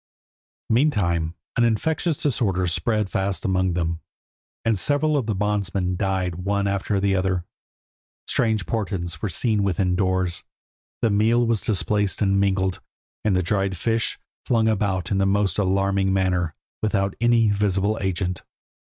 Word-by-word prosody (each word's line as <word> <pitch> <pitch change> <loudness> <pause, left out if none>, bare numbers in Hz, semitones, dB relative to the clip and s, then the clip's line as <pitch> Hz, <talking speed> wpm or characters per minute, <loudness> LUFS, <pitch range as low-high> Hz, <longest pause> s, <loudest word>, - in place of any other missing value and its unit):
Meantime 90 - +1 0.2
an 120 - +4
infectious 150 - +1
disorder 100 -10 0
spread 95 +5 0
fast 95 +1 -2
among 95 -1 +1
them, 85 -1 -1 0.7
and 110 -4 +2
several 150 +6 +1
of 130 -6 0
the 110 - 0
bondsmen 100 -2 -1
died 95 -2 -1
one 100 +2 0
after 100 0 0
the 100 0 +1
other. 95 -2 0 0.8
Strange 110 -5 +1
portents 90 -5 -3
were 105 - -1
seen 105 +4 +1
within 95 -2 +1
doors, 95 -1 0 0.6
the 115 - +3
meal 115 +4 +3
was 115 -2 +1
displaced 105 -1 0
and 100 -2 +2
mingled, 95 -2 +1 0.4
and 105 -3 +2
the 90 - +2
dried 95 +1 0
fish 115 +4 -1 0.3
flung 115 -2 +2
about 95 -4 0
in 100 -1 +2
a - - +3
most 100 -1 +1
alarming 95 0 +1
manner, 90 -3 0 0.3
without 100 -2 0
any 120 -2 +4
visible 100 +1 +1
agent. 90 -2 -2
100 Hz, 145 wpm, -23 LUFS, 95-110 Hz, 0.8 s, an